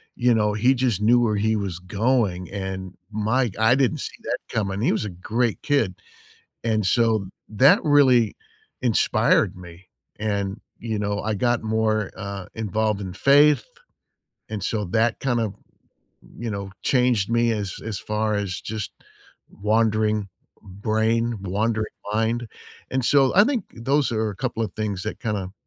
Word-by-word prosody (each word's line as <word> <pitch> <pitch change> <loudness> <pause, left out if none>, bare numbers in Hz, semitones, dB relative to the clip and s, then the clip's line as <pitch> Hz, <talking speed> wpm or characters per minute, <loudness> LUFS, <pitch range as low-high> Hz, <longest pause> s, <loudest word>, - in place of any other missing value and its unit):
you 125 -1 +3
know, 105 -1 +2
he 120 +6 +3
just 120 -6 0
knew 120 +3 +5
where 110 -3 +1
he 110 +2 +1
was 100 -5 -3
going, 100 -2 0
and 95 -2 -5 0.2
my 110 +4 +1
g 95 - -14
I 110 +2 +4
didn't 135 +3 +2
see - - -6
that - - -1
coming, 100 -2 -2
he - - +2
was 110 - -1
a 105 - -3 0.2
great 120 -2 +1
kid, 120 -11 +1 0.7
and 110 -3 +1
so, 110 0 +2 0.2
that 130 +7 +5
really 130 -7 +4 0.5
inspired 120 -4 +2
me, 90 0 -13 0.3
and, 100 -1 -2 0.2
you 110 -2 -3
know, 100 0 -1
I 110 +1 -1
got 120 +3 0
more, 110 -2 0
uh, 100 -1 -6
involved 110 -1 -1
in 95 -2 -5
faith, 145 +7 +5 0.8
and 105 -3 -5
so 105 0 -1
that 115 +5 +1
kind 125 -3 0
of, 110 -3 -2 0.8
you 115 0 -3
know, 100 -1 -5
changed 125 -6 +2
me 120 0 +3
as 100 -4 -3
as 110 -3 -3
far 105 0 -1
as 100 -3 -2
just 110 -2 -5 0.6
wandering 110 0 +1 0.3
brain, 110 +3 0
wandering 110 +3 -1 0.2
mind, 115 +1 0 0.4
and 130 0 0
so, 135 0 +4
I 205 - +8
think, 255 -2 0
those 135 +2 +1
are 110 0 0
a 95 - -9
couple 125 -3 -2
of 105 - -6
things 105 -4 -3
that 110 - -5
kinda 100 -4 -3
110 Hz, 160 wpm, -23 LUFS, 100-120 Hz, 0.8 s, I